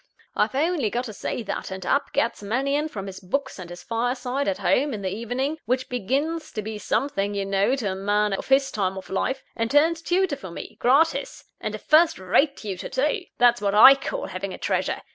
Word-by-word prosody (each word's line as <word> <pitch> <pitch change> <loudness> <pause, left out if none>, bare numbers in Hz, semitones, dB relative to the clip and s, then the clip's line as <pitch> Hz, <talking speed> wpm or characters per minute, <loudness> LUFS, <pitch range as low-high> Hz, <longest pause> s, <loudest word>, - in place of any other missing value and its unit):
I've - - +1
only 300 -5 +1
got 245 +4 -2
to 220 - -7
say 230 - -4
that; 200 -1 -4
and 190 -1 -6
up 280 - +1
gets 230 - 0
Mannion 275 +8 0
from 195 -8 -6
his 190 -1 -8
books 265 +6 -3
and 175 -2 -8
his 175 0 -10
fireside 250 +4 -2
at 290 -1 0
home, 275 -2 +1
in 200 - -7
the 190 0 -2
evening 250 +8 -2
which 255 +3 -1
begins 280 +8 -2
to 215 - -3
be 215 0 -5
something, 205 -5 -1
you 200 -1 -1
know, 195 +6 +2
to 220 -8 -2
a - - -3
man 205 +1 +1
of 195 - -4
his 270 0 +3
time 190 -2 -1
of 190 - -9
life 265 +7 -1
and 230 0 -1
turns 320 +5 +3
tutor 355 -3 +1
for 190 - -9
me, 170 - -8
gratis; 285 +7 +2 0.2
and - - -4
a - - -4
first 320 +2 +4
rate 275 - +2
tutor, 195 -4 -6
too! 300 +8 0
That's 240 -2 +4
what 200 0 0
I 265 +6 +10
call - - -4
having - - -5
a - - -11
treasure! - - -1
245 Hz, 220 wpm, -24 LUFS, 200-280 Hz, 0.2 s, I